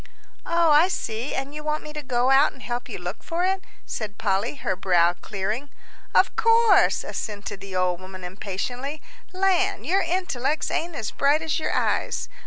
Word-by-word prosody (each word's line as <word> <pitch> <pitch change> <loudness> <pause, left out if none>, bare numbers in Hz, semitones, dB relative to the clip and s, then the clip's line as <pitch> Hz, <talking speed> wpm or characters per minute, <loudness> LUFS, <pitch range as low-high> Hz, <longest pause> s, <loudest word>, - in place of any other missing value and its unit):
"Oh, 335 -2 +4
I 300 +4 +6
see; 235 -7 -3
and 270 +2 -3
you 300 0 -6
want 305 0 -1
me 300 - -8
to 300 - -5
go 255 -1 +1
out 275 +2 +5
and 265 - -14
help 240 0 -4
you - - -5
look - - -6
for 345 +2 -1
it," 380 0 0 0.2
said 215 -2 -5
Polly, 200 +5 0
her 190 -8 -2
brow 175 -2 +3
clearing. 210 +9 -4 0.5
"Of - - +4
course," 455 -2 +5
assented 205 -2 -5
the 195 -1 -7
old 180 -1 +1
woman, 185 0 -9
impatiently. 215 +10 -4 0.3
"Land, 385 +1 +1
your 385 +3 +2
intellects 310 -5 -1
ain't 335 0 -2
as 220 -6 -3
bright 290 +3 +2
as 315 -2 0
your - - -1
eyes. - - 0
270 Hz, 180 wpm, -25 LUFS, 205-330 Hz, 0.5 s, I